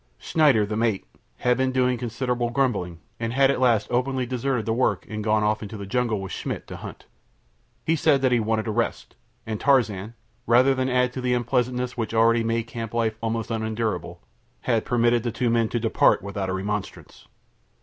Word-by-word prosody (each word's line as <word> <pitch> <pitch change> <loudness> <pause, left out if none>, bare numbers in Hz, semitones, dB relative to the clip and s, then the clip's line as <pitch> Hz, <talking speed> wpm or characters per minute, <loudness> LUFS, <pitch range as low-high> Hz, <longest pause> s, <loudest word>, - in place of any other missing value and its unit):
Schneider, 140 -10 +3
the 105 +1 -4
mate, 110 -3 0 0.3
had 125 0 +1
been 130 0 +1
doing 125 -1 +2
considerable 120 0 -2
grumbling, 110 -10 -1 0.2
and 115 0 -2
had 135 +1 +4
at 140 - -2
last 120 -5 +3
openly 130 +1 0
deserted 125 -1 -1
the 110 - 0
work 115 -6 0
and 110 -1 -5
gone 110 0 +2
off 105 0 +1
into 110 0 -7
the 100 - -6
jungle 115 0 0
with 95 - -6
Schmidt - - -4
to - - -8
hunt. - - -10 0.8
He 165 - +2
said 145 -4 +2
that 130 - +3
he 120 - +3
wanted 110 0 0
a - - 0
rest, - - -2 0.3
and 110 -2 -4
Tarzan, 115 -6 +1 0.3
rather 125 +4 +5
than 130 0 -1
add 125 0 +1
to 130 - -4
the 125 0 +1
unpleasantness 125 +1 -1
which 115 -1 -3
already 115 +1 +4
made 115 0 0
camp 115 -1 -7
life 115 -2 +1
almost 115 0 -2
unendurable, 110 0 -3 0.4
had 115 -3 0
permitted 120 -1 +2
the 120 0 -2
two 120 +1 0
men 115 -1 +2
to 120 - -1
depart 110 -3 +3
without 100 -1 -4
a - - -1
remonstrance. 100 0 -5
115 Hz, 195 wpm, -24 LUFS, 110-125 Hz, 0.8 s, rather